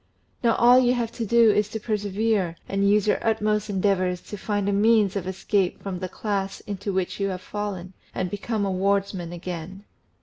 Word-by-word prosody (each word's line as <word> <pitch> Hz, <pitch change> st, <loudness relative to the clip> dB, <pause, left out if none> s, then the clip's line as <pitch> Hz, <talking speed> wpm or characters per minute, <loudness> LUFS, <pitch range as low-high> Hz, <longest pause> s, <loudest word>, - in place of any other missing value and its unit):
Now 230 Hz, -1 st, +4 dB
all 245 Hz, +2 st, +6 dB
you 250 Hz, 0 st, +3 dB
have 235 Hz, -2 st, -2 dB
to 230 Hz, -2 st, -4 dB
do 235 Hz, 0 st, +6 dB
is 210 Hz, 0 st, +1 dB
to 220 Hz, -, -4 dB
presevere 210 Hz, -3 st, -1 dB
and 200 Hz, 0 st, +1 dB
use 210 Hz, 0 st, +3 dB
your 210 Hz, -, +2 dB
utmost 215 Hz, -2 st, 0 dB
endeavours 185 Hz, -2 st, +1 dB
to -, -, -8 dB
find 205 Hz, -1 st, -2 dB
a 205 Hz, -, +1 dB
means 210 Hz, -1 st, +3 dB
of 190 Hz, -2 st, -3 dB
escape 190 Hz, 0 st, 0 dB
from 190 Hz, -3 st, -4 dB
the 185 Hz, 0 st, -4 dB
class 195 Hz, -1 st, -3 dB
into 200 Hz, 0 st, -4 dB
which 190 Hz, 0 st, -2 dB
you 195 Hz, -, +1 dB
have 185 Hz, -1 st, -4 dB
fallen, 195 Hz, -3 st, -5 dB, 0.2 s
and 185 Hz, -, -2 dB
become 205 Hz, +1 st, -2 dB
a 195 Hz, -, -1 dB
wardsman 195 Hz, -2 st, 0 dB
again. 175 Hz, +2 st, -7 dB
200 Hz, 195 wpm, -25 LUFS, 190-215 Hz, 0.2 s, all